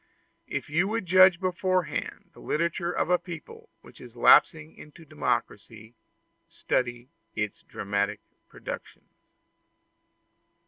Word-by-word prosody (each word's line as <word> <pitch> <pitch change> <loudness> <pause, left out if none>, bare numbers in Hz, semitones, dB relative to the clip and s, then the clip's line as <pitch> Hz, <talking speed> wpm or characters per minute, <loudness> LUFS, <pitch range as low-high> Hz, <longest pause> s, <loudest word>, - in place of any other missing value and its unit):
If - - -4
you 170 +6 +1
would 220 -1 -2
judge 185 0 +6
beforehand 185 -3 -2
of - - -37
the - - -17
literature 170 +2 -1
of 180 - -1
a 180 - +4
people 170 -4 -10
which - - -17
is 120 -1 -13
lapsing 155 +6 +4
into 155 +2 -15
democracy, 115 -6 -4 0.6
study 120 0 -2 0.3
its 105 -2 -3
dramatic 100 0 -3 0.3
productions. - - -9
160 Hz, 110 wpm, -27 LUFS, 120-180 Hz, 0.6 s, judge